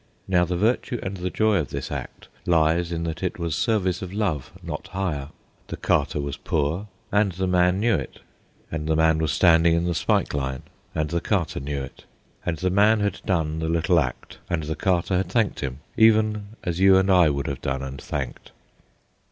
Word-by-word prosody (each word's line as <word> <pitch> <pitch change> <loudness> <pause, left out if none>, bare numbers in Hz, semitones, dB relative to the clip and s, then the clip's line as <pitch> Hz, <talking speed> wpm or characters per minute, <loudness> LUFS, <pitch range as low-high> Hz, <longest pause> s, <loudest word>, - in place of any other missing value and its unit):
Now 90 -2 +3
the 90 +1 -2
virtue 120 +4 0
and 95 0 -4
the 90 0 -2
joy 110 +1 +2
of 75 -6 -1
this 70 -1 -5
act - - -6 0.2
lies 85 0 +2
in 85 -1 -2
that 85 0 -4
it 90 -2 -2
was 85 -3 -2
service 95 +1 0
of 95 - -6
love, 95 - -2
not - - -5
hire. 80 -7 -3 0.4
The - - -6
carter - - +1
was 70 -1 -4
poor, 80 +7 -1 0.2
and 105 -2 +2
the 95 +2 -2
man 90 0 +3
knew 115 +2 +2
it; - - -3 0.5
and 80 -1 -3
the 80 - +2
man 80 0 +3
was 80 -2 0
standing 85 -1 +5
in 85 +1 0
the 90 - 0
spike - - +1
line, 65 -3 -3 0.3
and 75 -1 -1
the 85 0 0
carter 95 -6 -1
knew 70 0 -3
it; 65 - -11 0.4
and 85 -2 -2
the 90 +3 0
man 105 +3 +4
had 100 -1 -1
done 80 -5 0
the 80 0 -2
little 85 +1 +3
act, 65 -5 -4
and 80 -2 -1
the 80 +1 -3
carter 90 +1 +1
had 95 - -1
thanked 115 -4 +1
him, 65 -1 -4
even 110 -2 +4 0.2
as 85 -1 -2
you 95 0 +7
and 95 +1 +3
I 90 -4 +6
would 70 -1 -2
have 70 -2 -4
done 65 0 -2
and 70 0 -6
thanked. 65 -5 -5
85 Hz, 205 wpm, -24 LUFS, 75-95 Hz, 0.5 s, you